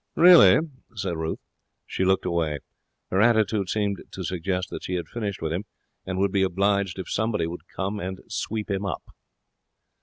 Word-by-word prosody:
'Really?' 165 - +8 0.4
said 95 -4 -2
Ruth. 80 0 -2 0.5
She - - -2
looked 95 0 +2
away. 85 -4 0 0.5
Her 95 - +3
attitude 110 -4 +3
seemed 100 -3 -1
to 95 - -6
suggest 90 +1 -2
that - - -5
she 90 - -2
had 85 - -3
finished 100 -7 -4
with 80 0 -1
him, 95 +5 -3 0.4
and 90 0 -2
would 100 0 +2
be 100 - +2
obliged 100 0 +1
if 95 - -5
somebody 110 -4 0
would 85 +2 -7
come 100 +2 -3
and 95 0 -4
sweep 110 -1 -3
him 100 0 -1
up. 100 - -3
95 Hz, 175 wpm, -25 LUFS, 90-105 Hz, 0.5 s, Really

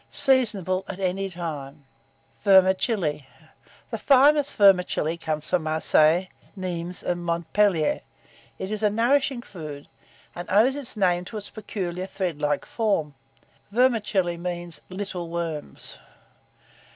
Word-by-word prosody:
Seasonable 205 -9 +2
at 195 - -7
any 195 +1 -1
time. 150 -5 -7 0.6
VERMICELLI. 190 - +3 0.6
The - - -3
finest 285 +1 +4
vermicelli 180 -5 +4
comes 155 -2 -4
from 180 - +1
Marseilles, 160 +2 +3 0.3
Nimes, 180 -2 -5
and 175 -1 -2
Montpellier. 170 - +1 0.6
It 190 +2 -5
is 215 -1 -2
a 210 - +3
nourishing 245 +3 +1
food, 155 -8 -9 0.5
and 175 - -8
owes 225 +7 +4
its 265 -5 -4
name 180 -3 +2
to 220 - -7
its 205 - -4
peculiar 185 -4 -5
thread 180 -6 -3
like 150 0 0
form. 195 -10 -1 0.6
Vermicelli 210 -7 +1
means, 175 -1 -5
little 185 -3 -5
worms. 165 -3 -5
185 Hz, 115 wpm, -25 LUFS, 170-210 Hz, 0.6 s, finest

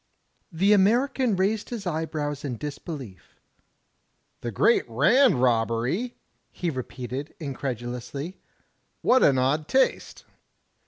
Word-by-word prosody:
'* - - -45
The 195 +5 +3
American 240 +4 +3
raised 205 +3 0
his 230 -4 -5
eyebrows 155 -3 -3
in 130 -5 -4
disbelief. 140 - -8 0.5
" - - -47
*The 120 - -3
Great 170 - +3
Rand 145 - +4
Robbery?' 120 - +1 0.4
"he 175 -2 -2
repeated, 130 +1 -6
incredulously. 135 - -5 0.6
"What 255 - +5
an 135 - +5
odd 145 +4 +1
taste!" 265 0 0
150 Hz, 110 wpm, -25 LUFS, 125-200 Hz, 0.6 s, What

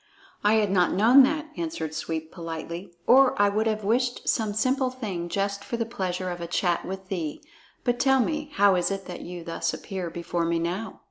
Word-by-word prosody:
"I 210 +1 +4
had 210 -3 +2
not 180 -3 +3
known 230 +8 +7
that," 305 +2 -2
answered 320 - -4
Sweep 160 +1 -4
politely, 170 +2 -6
"or 265 -2 +5
I 205 0 +5
would 215 +2 0
have 215 -1 -1
wished 245 +4 0
some 220 -3 +1
simple 255 +4 +1
thing 200 -9 -5
just 200 +1 -1
for 235 - -4
the 230 - -1
pleasure 185 -5 -3
of 175 0 -6
a 170 - -4
chat 175 0 0
with 190 0 -6
thee. 165 -6 -3 0.4
But 245 -1 0
tell 265 0 +4
me, 300 +3 -1
how 200 -1 +5
is 180 -1 +1
it 195 -1 -4
that 180 - -7
you 175 -1 -7
thus 165 0 -2
appear 185 -3 -5
before 170 0 -3
me 170 0 +1
now?" 180 +7 -3
195 Hz, 205 wpm, -26 LUFS, 175-235 Hz, 0.4 s, known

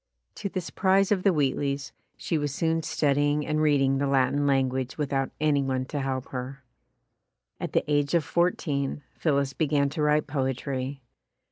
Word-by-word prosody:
To 200 - -4
the 185 - -3
surprise 190 +2 +2
of 195 -3 +3
the 195 - +4
Wheat 145 -6 +1
leys, 140 -1 -3 0.2
she - - -2
was 145 -1 -1
soon 165 +3 0
studying 145 -1 +1
and 155 0 0
reading 135 -3 +3
the 140 - +1
Latin 140 +1 +2
language 130 -1 0
without 135 -3 -1
any 150 -2 +2
one 130 -1 -1
to 145 +2 -4
help 130 -1 -3
her. 130 +1 -6 1.0
At - - -4
the - - +3
age 145 +1 +1
of 170 - +3
fourteen, 150 -4 0
Phillis 140 -3 0
began 145 -2 +1
to 150 - -4
write 150 0 +3
poetry. 135 -1 -3
140 Hz, 165 wpm, -27 LUFS, 135-155 Hz, 1.0 s, the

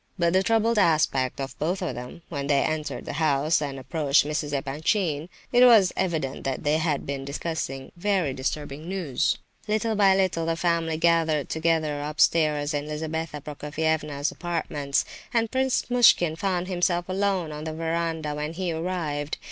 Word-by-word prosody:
By 170 -2 +2
the 190 +1 +4
troubled 225 +1 +2
aspect 150 -8 +2
of 135 0 -5
both 175 +5 0
of 165 - -2
them, 125 +7 -8
when 140 -4 -4
they 140 -1 +3
entered 155 -4 -3
the - - -5
house, 150 0 +2
and 140 -2 -3
approached 145 +1 +2
Mrs. 150 0 -2
Epanchin, 150 +3 -1 0.2
it 245 -1 +6
was 220 -7 +7
evident 155 -7 -2
that 135 +2 -3
they 150 +1 +2
had 155 -3 -1
been 140 -1 -4
discussing 140 -2 -4
very 180 -6 0
disturbing 145 +4 -4
news. 155 -8 0 0.3
Little 220 +1 0
by 195 -2 +5
little 185 -4 +1
the 165 - +1
family 165 -2 0
gathered 165 -3 +2
together 160 -2 0
upstairs 150 0 +2
in 145 0 -2
Lizabetha 155 0 -4
Prokofievna's 150 0 -2
apartments, 155 -5 -2 0.3
and 230 -1 +2
Prince 260 0 +1
Muishkin 230 -10 +5
found 180 0 -1
himself 175 -1 0
alone 190 -3 0
on 150 +1 -6
the 160 - -3
verandah 165 -2 -2
when 150 +2 -4
he 180 0 -2
arrived. 160 -4 -3
160 Hz, 160 wpm, -25 LUFS, 145-175 Hz, 0.3 s, was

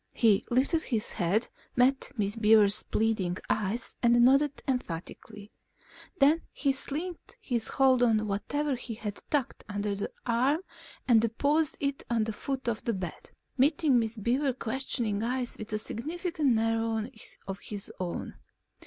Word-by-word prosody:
He 220 -4 +4
lifted 270 +7 +2
his 225 -8 -1
head, 200 +4 +1 0.3
met 260 +2 +3
Miss 205 -1 0
Beaver's 215 -2 +5
pleading 210 -5 0
eyes, 215 +4 -1
and 240 0 +4
nodded 275 +2 +3
emphatically. 210 -2 -5 0.7
Then 300 +3 +4
he 280 - +1
slackened 315 - -5
his 245 - -1
hold 260 -2 +3
on 220 -3 +3
whatever 280 +8 -1
he 235 -2 -6
had 210 -2 -6
tucked 285 -5 -1
under 205 0 -2
one 200 0 -3 0.2
arm 255 +7 +2 0.5
and 230 -3 +6
deposited 285 +7 +1
it - - -6
at 230 -2 +1
the 220 - -3
foot 265 +3 -4
of 230 -2 -1
the 230 - -1
bed, 180 -3 -6 0.3
meeting 285 -1 +4
Miss 225 0 -2
Beaver's 250 +5 0
questioning 230 -4 -1
eyes 245 +1 -2
with 215 - -7
a 215 - 0
significant 310 - -1
narrowing 225 +1 0 0.4
of 195 0 -5
his 205 -2 -6
own. 180 -2 -4
235 Hz, 145 wpm, -29 LUFS, 215-270 Hz, 0.7 s, and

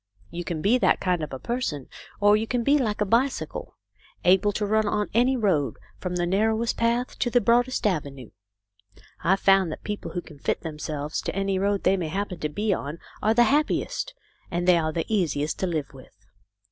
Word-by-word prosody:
You 175 - -4
can 165 -2 -4
be 235 +6 +4
that - - +3
kind 180 -3 0
of 150 - -5
a 130 - -4
person, 150 - -3 0.3
or 205 0 +5
you 220 +1 -1
can 245 -1 0
be 285 +4 +4
like 215 -5 -1
a - - +3
bicycle, 240 +7 -1 0.5
able 190 +3 +5
to 210 - -1
run 215 +1 +2
on 210 0 -1
any 250 +4 +3
road, 160 - +1 0.2
from 180 -1 -3
the 175 0 0
narrowest 220 +5 +1
path 235 +2 0
to 245 - +1
the 245 - +4
broadest 245 +1 +2
avenue. 140 - -2 0.9
I've 190 +3 +2
found 195 -3 +4
that - - -7
people 210 0 -5
who 175 - -2
can 150 -4 -14
fit - - -1
themselves 150 -1 -4
to - - -4
any 195 -1 0
road 200 0 0
they 195 - +3
may 175 -3 -2
happen 190 +1 -3
to 150 - -2
be 205 +6 0
on 145 -1 -4 0.2
are 220 +1 +2
the 240 - +6
happiest, 305 - 0 0.3
and 175 0 -2
they 175 -2 +6
are 155 -1 -1
the 165 0 -2
easiest 155 -8 0
to 190 - 0
live 155 -6 -3
with. 130 -3 -15
195 Hz, 205 wpm, -25 LUFS, 165-225 Hz, 0.9 s, the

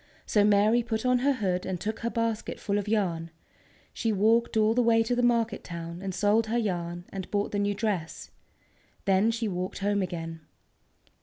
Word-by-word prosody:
So 210 - +3
Mary 210 +3 +4
put 225 0 -3
on 250 0 +3
her 280 +3 +2
hood 185 -7 -1
and 185 -2 -3
took 215 +4 -3
her 235 - -2
basket 230 -2 -2
full 205 0 0
of 205 - -5
yarn. 180 -6 0 0.6
She 225 - -1
walked 220 +3 +2
all 215 0 +4
the 245 - +3
way 230 -1 +4
to 245 +2 0
the 245 - +1
market 235 -3 +1
town 170 0 -7
and 195 -1 -3
sold 205 +4 +2
her 230 +2 0
yarn, 175 -5 -2
and 190 -2 -5
bought 205 0 -1
the 205 - -1
new 205 0 0
dress. 200 -7 -3 0.7
Then 195 +3 +3
she 230 0 -1
walked 185 -1 -3
home 200 0 0
again. 165 -3 -4
205 Hz, 190 wpm, -28 LUFS, 185-230 Hz, 0.7 s, Mary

